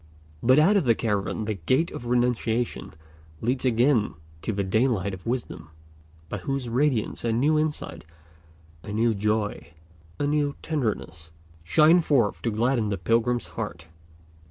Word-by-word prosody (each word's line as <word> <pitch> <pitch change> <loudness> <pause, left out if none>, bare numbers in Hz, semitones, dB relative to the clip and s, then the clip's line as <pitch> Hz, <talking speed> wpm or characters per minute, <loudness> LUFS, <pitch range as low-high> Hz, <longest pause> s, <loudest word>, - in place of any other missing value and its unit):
But 130 +3 +5
out 185 +7 +5
of 180 - +1
the 115 -2 +4
cavern 105 -1 -1
the 110 - -1
Gate 130 - 0
of 120 - -7
Renunciation 120 -4 0 0.4
leads 125 +3 -1
again 120 - +2 0.3
to 110 - -2
the 100 -1 -1
daylight 105 -1 +1
of 95 +1 -9
wisdom, 120 -9 -4 0.6
by 105 - -5
whose 135 +4 -3
radiance 125 -2 0
a 115 - +1
new 145 +7 +2
insight, 150 - -3 0.8
a 100 - -8
new 115 +2 +2
joy, 105 -3 -2 0.4
a 145 - -1
new 145 -1 0
tenderness, 110 - -3 0.3
shine 155 - +5
forth 130 -10 +1
to 115 - 0
gladden 115 0 +1
the 100 - -1
pilgrim's 115 +5 0
heart. 85 -8 -6
115 Hz, 145 wpm, -25 LUFS, 105-135 Hz, 0.8 s, But